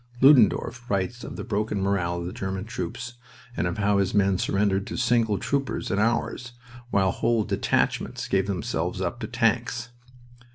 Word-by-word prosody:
Ludendorff 125 -2 +4
writes 100 +4 -1
of - - -7
the - - -5
broken 105 0 -1
morale 95 -3 0
of - - -5
the 90 - -5
German 95 0 -4
troops, 115 +3 -5 0.4
and 90 - 0
of 90 - -3
how 100 -1 +2
his 100 +1 0
men 100 -2 +3
surrendered 100 0 +1
to - - -5
single 115 -4 +2
troopers 140 +4 -2
of 100 - +1
ours, 120 +2 0 0.4
while 95 -4 +2
whole 115 +2 +1
detachments - - 0
gave 95 0 +1
themselves 95 -4 -2
up - - -2
to - - -4
tanks. 120 0 0
100 Hz, 165 wpm, -25 LUFS, 95-120 Hz, 0.4 s, Ludendorff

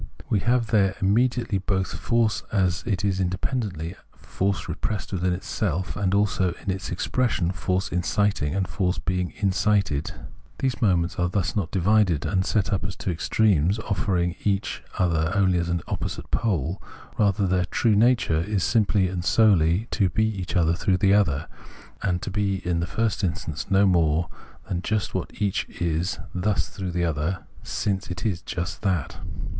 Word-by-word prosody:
We 105 - +3
have 120 +3 +2
there 100 -3 +3
immediately 115 +1 +2
both 95 -1 -1
force 115 -2 +1
as 90 -4 +1
it 100 -2 0
is 95 -2 0
independently, 95 - -2 0.2
force 100 -1 -2
repressed 100 +5 -3
within 90 -1 +1
itself, 90 0 -2
and 100 -1 0
also 95 -3 +1
its 95 0 -2
expression, 95 -1 0
force 95 +1 -1
inciting 90 -3 0
and 95 -2 0
force 90 -2 -1
being 90 -1 -1
incited. 95 -6 +1 0.5
These 130 -2 -1
moments 90 -5 +2
are 90 0 +2
thus 95 -1 -1
not 100 -6 -1
divided 95 -4 +2
and 95 -2 +1
set 100 0 0
up 95 - 0
as 95 0 -4
two 95 - -3
extremes, 95 +1 +2
offering 95 -5 -1
each 100 -1 -1 0.2
other 85 -3 +1
only 95 -3 +3
an 85 -1 -1
opposite - - -4
pole: 90 - 0 0.4
rather 100 -1 +3
their 90 -1 +1
true 110 +4 +2
nature 115 -7 +3
is 100 +1 -1
simply 105 -4 +2
and 90 -1 -3
solely 100 -1 +4
to 100 -4 +2
be 110 +4 +1
each 95 -4 -3 0.2
through 95 0 +2
the 95 +1 +4
other, 80 -8 +2 0.5
and 90 -3 -1
to - - -4
be 100 -1 0
in 85 -1 +1
the 85 - -1
first 110 -2 -1
instance 85 -4 -3
no 95 +1 +4
more 85 -3 +2 0.4
than 90 -1 -2
just 110 0 -1
what - - -2
each 100 -2 0
is 85 +1 0 0.2
thus 95 +3 0
through 95 -2 -5
the 85 0 0
other, 80 +3 -1 0.2
since 100 -1 -2
it 90 +2 -5
is 90 -6 0
just 85 +1 -4
that. 95 -8 -1
95 Hz, 160 wpm, -25 LUFS, 90-105 Hz, 0.5 s, solely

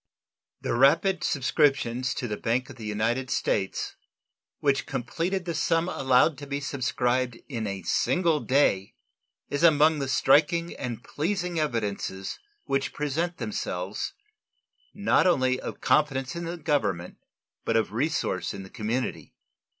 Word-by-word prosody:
The - - -1
rapid 160 +9 +4
subscriptions 130 -3 +1
to 125 - -3
the 105 - -2
Bank 125 +5 -1
of - - -11
the 110 -2 -7
United 115 +5 0
States, 95 -5 -1 0.6
which 140 -1 +1
completed 165 +9 -2
the 170 - -2
sum 165 +2 +1
allowed 135 -1 +3
to 145 - -8
be 140 0 -2
subscribed 130 -3 0
in 115 -6 -3
a 100 -2 -4
single 170 - +2
day, 130 -9 +2 0.6
is 145 - -1
among 155 -1 +5
the 140 - -2
striking 165 +6 +3
and 120 -2 -5
pleasing 175 +1 -2
evidences 105 -8 -2 0.3
which 135 0 -1
present 160 +4 -2
themselves, 95 -2 -3 0.8
not 200 -2 +3
only 130 -7 +2
of - - -6
confidence 135 -2 +2
in 170 0 -4
the 170 +1 -4
Government, 110 - -1 0.5
but 115 - +1
of 110 -2 0
resource 120 - -1
in 100 - -7
the 95 - -12
community. 120 +3 -3
135 Hz, 135 wpm, -27 LUFS, 115-155 Hz, 0.8 s, among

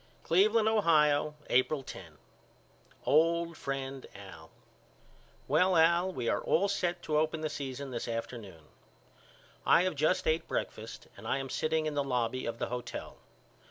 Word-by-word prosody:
Cleveland, 210 +6 +3
Ohio, 150 -8 +3 0.2
April 135 +3 +2
10. 85 -11 -10 0.9
OLD 170 +2 +3
FRIEND 135 -2 -5
AL: 95 -5 -11 1.0
Well 180 +5 +3
Al 170 +3 +4
we 125 -8 -4
are - - +1
all 195 +5 +2
set 175 -3 -1
to 150 -1 +1
open 155 0 -1
the 155 - -1
season 135 0 -5
this 120 - -4
afternoon. 115 -7 -6 1.0
I 175 - +5
have 185 -1 0
just 155 +5 +1
ate 160 +1 +1
breakfast - - -5
and - - -10
I - - +1
am 135 -1 -5
sitting 155 0 0
in 155 - -1
the 145 -1 0
lobby 125 -1 -1
of 115 0 -3
the - - -3
hotel. 125 0 -6
150 Hz, 150 wpm, -31 LUFS, 125-170 Hz, 1.0 s, I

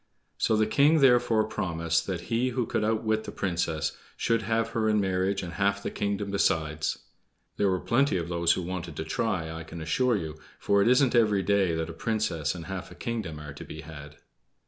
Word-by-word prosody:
So 110 - +2
the 110 - +3
king 145 +8 +4
therefore 120 -4 +4
promised 85 -5 -1
that 90 -3 -2
he 120 +3 +2
who 125 -1 -1
could 105 - -1
outwit 110 0 0
the - - -6
Princess 85 -4 -1 0.3
should 115 -1 +1
have 115 +1 0
her 110 -1 0
in 105 0 +3
marriage 95 0 0
and 85 -1 -6
half 100 +2 0
the - - -3
kingdom 100 0 -2
besides. 80 -5 0 0.6
There 100 - +2
were 95 -1 +1
plenty 120 -1 +2
of 85 -1 -3
those 85 -1 +2
who 90 - -3
wanted 85 -3 -5
to 80 - -3
try, 80 -1 -1
I 80 0 -6
can 80 +1 -9
assure 80 +11 +1
you; 80 -4 -6 0.2
for 100 0 +2
it 100 - +3
isn't 125 +1 +4
every 105 -5 +3
day 95 -3 +2
that 80 0 -2
a - - -9
princess 85 -6 -1
and 85 -2 -7
half 95 0 -6
a - - -12
kingdom 110 -11 -4
are 75 -2 -8
to 75 - -9
be 75 - -8
had. 75 -1 -10
95 Hz, 210 wpm, -28 LUFS, 80-110 Hz, 0.6 s, king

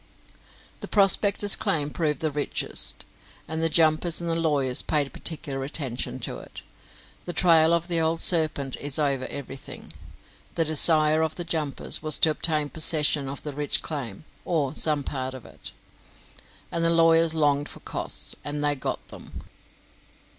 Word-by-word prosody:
The - - -8
prospectors' 205 0 +3
claim 150 -2 -2
proved 150 -4 -2
the 155 -1 -1
richest, 145 0 -2 0.4
and 160 +1 -4
the 165 - +2
jumpers 160 +1 +2
and 170 - -5
the 165 0 -1
lawyers 140 -6 +1
paid 145 -3 0
particular 140 -4 -3
attention 130 -3 -4
to - - -2
it. - - -10 0.6
The 175 - -5
trail 165 -2 +5
of 170 0 +1
the 170 -2 +3
old 160 +1 0
serpent 155 -7 +3
is 145 0 -2
over 140 -4 -1
everything. 135 -1 -8 0.6
The 165 - +1
desire 155 0 +6
of 160 -1 -2
the 175 - -3
jumpers 160 -4 -3
was 155 0 0
to 160 - +3
obtain 155 -1 0
possession 150 -3 +1
of 140 - -8
the 150 - -6
rich 145 +1 -2
claim, 135 -6 -6 0.2
or 150 -6 -1
of - - -7
some 150 -2 0
part 130 -1 -5
of 130 - -12
it; - - -10 1.0
and 170 - -2
the 165 - +2
lawyers 165 -1 +3
longed 145 -2 +1
for - - -8
costs, - - -3
and 145 0 -4
they 145 0 +2
got 135 - -5
them. - - -11
155 Hz, 160 wpm, -24 LUFS, 140-165 Hz, 1.0 s, desire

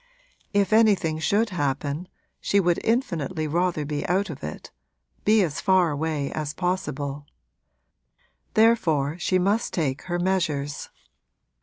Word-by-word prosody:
If 200 0 +2
anything 200 -8 +3
should 205 +8 +1
happen 145 +1 -2 0.3
she 200 - +2
would 175 -3 +2
infinitely 180 - -1
rather 170 0 0
be 145 0 -3
out 190 +1 +1
of 140 - -10
it 75 - -7 0.5
be 215 0 +5
as 155 -4 -3
far 185 -4 +3
away 150 -1 -2
as 150 -1 -4
possible. 145 -6 -3 1.3
Therefore 170 -9 +3
she 185 - +1
must 200 +5 0
take 145 -5 -1
her 175 -1 -2
measures. 160 -6 -1
170 Hz, 125 wpm, -25 LUFS, 145-190 Hz, 1.3 s, be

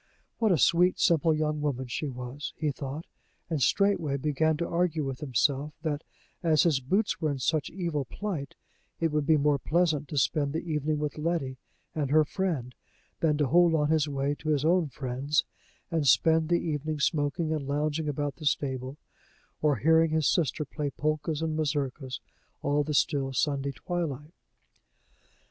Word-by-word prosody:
What 220 -3 +3
a 175 - +4
sweet, 175 +5 +4
simple 165 -2 +3
young 155 -1 0
woman 135 -3 -1
she 135 +5 -3
was! 125 +3 -6
he 150 -2 0
thought; 140 +3 -6 0.5
and 155 -4 0
straightway 170 - +2
began 150 +2 +1
to 170 - -2
argue 170 -2 0
with 135 -1 -4
himself 140 +2 0
that, 150 -1 -2 0.4
as 160 -4 +4
his 160 -7 +3
boots 185 - 0
were 155 - +1
in 140 - -2
such 145 +3 0
evil 170 -6 -2
plight, 170 - -5 0.4
it 165 -1 +1
would 150 -1 0
be 160 - +5
more 145 -1 +2
pleasant 155 -3 +1
to 150 - -5
spend 140 +1 +1
the 160 - -2
evening 150 -1 0
with 150 0 -3
Letty 150 -5 -2 0.3
and 145 -4 -1
her 155 +1 +5
friend, 150 -9 -2 0.5
than 155 -2 +2
to 145 - +2
hold 170 +4 +4
on 150 -1 +2
his 155 -1 +2
way 140 0 0
to 155 - -4
his 150 -1 +1
own 175 0 +3
friend's, 135 +3 -1 0.5
and 160 -4 +1
spend 160 +5 +4
the 175 - +4
evening 155 0 -2
smoking 155 +2 0
and 145 -3 -3
lounging 150 +2 -1
about 145 -1 -2
the 155 - -9
stable, 130 -1 -1 0.6
or 150 -2 +3
hearing 160 +6 +4
his 155 -2 +1
sister 155 -2 +1
play 145 0 -3
polkas 155 +2 -2
and 160 -1 -1
mazurkas 140 -3 -2 0.4
all 145 +1 +2
the 150 +1 -2
still 140 -3 +1
Sunday 140 +1 0
twilight. 155 -1 -4
150 Hz, 170 wpm, -28 LUFS, 140-160 Hz, 0.6 s, be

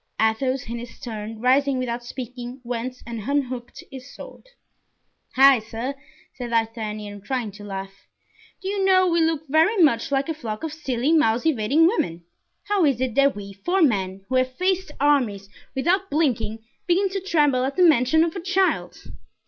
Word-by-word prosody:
Athos, 250 +4 0
in 235 +1 -4
his 240 0 -10
turn, 220 -1 -6
rising 265 +3 +3
without 240 -1 -3
speaking, 245 +1 -7
went 245 +1 -5
and 230 0 -6
unhooked 255 -4 -3
his 265 +1 -10
sword. - - -12 0.9
"Heigh, 270 -1 +7
sir," 225 +5 -5 0.4
said 245 -2 -6
D'Artagnan, 215 -3 -3
trying 235 0 -3
to 205 +1 -12
laugh, 195 -1 -8 0.6
"do - - -4
you 395 0 -1
know 375 -1 +5
we 340 -1 +2
look 320 -1 0
very 320 +10 +3
much 280 -9 +3
like 275 0 +1
a 325 - -1
flock 225 -7 -6
of 320 -2 -3
silly, 275 -2 -1
mouse 240 -6 +2
evading 285 +2 +3
women! 175 - 0 0.4
How 410 -3 +1
is 275 -6 +2
it 260 -2 -1
that 275 +2 +3
we, 200 -1 -8
four 350 - 0
men 195 -7 0
who 260 - +1
have 255 0 0
faced 375 -2 0
armies 245 -9 +1 0.3
without 365 +8 +1
blinking, 240 -7 0 0.2
begin 370 +3 +3
to 390 +1 -3
tremble 295 -9 +2
at 270 +1 -2
the 365 - +4
mention 315 0 +5
of 330 +1 -2
a - - -3
child?" 380 +1 -1
255 Hz, 175 wpm, -23 LUFS, 225-320 Hz, 0.9 s, Heigh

